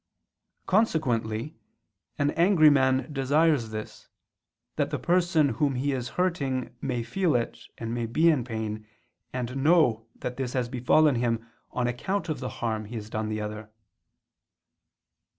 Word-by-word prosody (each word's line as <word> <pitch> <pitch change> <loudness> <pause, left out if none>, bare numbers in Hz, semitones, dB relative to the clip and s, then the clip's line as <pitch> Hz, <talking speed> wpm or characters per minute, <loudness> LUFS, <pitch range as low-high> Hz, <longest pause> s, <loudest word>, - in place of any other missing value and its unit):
Consequently 135 - 0 0.6
an 145 0 +1
angry 165 -2 +5
man 130 0 +2
desires 140 -2 +2
this, 110 0 -7 0.7
that - - 0
the - - -2
person 175 -4 +2
whom 140 -1 0
he 140 +3 0
is 125 -2 -3
hurting, 140 -9 -1
may 125 -3 -2
feel 170 +6 0
it 120 -1 -1 0.2
and 115 0 -3
be 165 +7 +5
in 140 -6 0
pain, 110 -2 -5 0.4
and 125 +1 -4
know 135 -7 +3
that 125 - -5
this 130 -2 -3
has 125 -2 -1
befallen 135 +5 +3
him 115 -1 0 0.2
on 125 - -1
account 170 +9 -2
of 150 -4 -2
the 130 -1 -4
harm 110 -2 -3
he 115 +4 -8
has 110 -1 -7
done 110 0 -2
the 110 0 -2
other. 105 0 -6
130 Hz, 145 wpm, -27 LUFS, 115-155 Hz, 0.7 s, angry